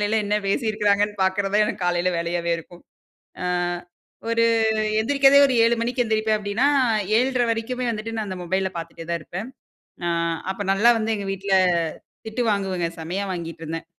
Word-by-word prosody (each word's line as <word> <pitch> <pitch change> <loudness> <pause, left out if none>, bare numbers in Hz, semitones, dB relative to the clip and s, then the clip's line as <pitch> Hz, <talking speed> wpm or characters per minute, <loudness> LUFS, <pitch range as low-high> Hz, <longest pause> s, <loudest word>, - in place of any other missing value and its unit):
அதலேலாம் 210 +1 +1
என்ன 210 - +1
பேசியிருக்கிறாங்கன்னு 210 -2 +1
பார்க்குறது 195 +1 0
தான் 210 0 +5
எனக்கு 190 - -4
காலையில 175 0 +1
வேலையாவே 170 0 -2
இருக்கும். 175 +1 -13 0.6
ஆ - - -3 0.8
ஒரு 230 0 +2 0.6
எந்திரிக்கிறதே 275 +4 +5
ஒரு 265 - 0
7:00 235 - +4
மணிக்கி 245 +2 0
எழுந்திரிப்பேன் 220 -1 +1
அப்பிடின்னா, 210 +7 +1 0.5
7:30 255 -1 +1
வரைக்குமே 245 +2 -2
வந்துட்டு 225 +1 -4
நான் 220 -2 -2
அந்த 185 - -5
மொபைல்ல 190 +1 -1
பார்த்துட்டே 165 0 -8
தான் 170 -1 -1
இருப்பேன். 190 +9 -6 0.6
ஆ - - +1 0.4
அப்ப 190 - -13
நல்லா 225 +5 +5
வந்து 220 0 0
எங்க 200 -1 -5
வீட்ல 195 +1 -4 0.7
திட்டு 230 +3 -2
வாங்குவேங்க. 190 -4 -1
செம்மையா 180 +5 -3
வாங்கிட்டு 165 -2 -6
இருந்தேன். 165 +1 -5
205 Hz, 160 wpm, -23 LUFS, 185-225 Hz, 0.8 s, தான்